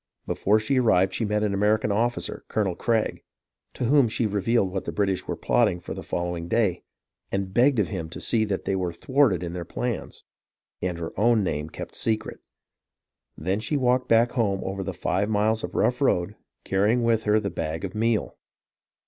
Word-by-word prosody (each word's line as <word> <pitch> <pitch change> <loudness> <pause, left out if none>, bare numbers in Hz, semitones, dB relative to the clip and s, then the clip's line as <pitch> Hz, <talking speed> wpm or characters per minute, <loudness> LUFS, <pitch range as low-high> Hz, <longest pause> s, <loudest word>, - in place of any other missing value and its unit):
Before 105 +2 +2
she 130 +5 +1
arrived 95 -6 +3
she 115 - -1
met 105 0 0
an 105 -2 0
American 105 +2 +2
officer, 120 +4 -1
Colonel 100 -4 0
Craig, 115 +2 0 0.5
to - - -3
whom 135 0 +5
she 115 +1 -1
revealed 105 -1 +1
what 95 0 -3
the - - -3
British 100 -2 -1
were - - -2
plotting 90 - +2
for - - -7
the - - -7
following 85 -1 -3
day, 95 -3 +1 0.5
and 95 -1 -2
begged 125 +4 +4
of 100 -6 +1
him 80 -3 -4
to - - -7
see 110 -2 +1
that 100 -2 -3
they 95 - 0
were 90 -2 -2
thwarted 125 - +2
in 85 -1 -4
their 90 -1 -4
plans, 120 +6 -4 0.6
and 90 -2 -2
her 85 -1 -5
own 115 -1 +4
name 75 -3 -2
kept - - -8
secret. 110 -1 -1 1.0
Then 95 +6 -1
she 115 +7 -1
walked 125 -1 +2
back 115 +1 +4
home 100 -6 0
over 95 0 -3
the 95 - -3
five 95 +3 0
miles 110 +1 +1
of - - -5
rough 125 +3 +1
road, 100 -6 +1 0.3
carrying 105 +5 +2
with 115 -1 +2
her 105 +1 +4
the 100 -3 -3
bag 80 +1 -3
of 95 - -6
meal. 115 0 0
105 Hz, 190 wpm, -25 LUFS, 95-115 Hz, 1.0 s, whom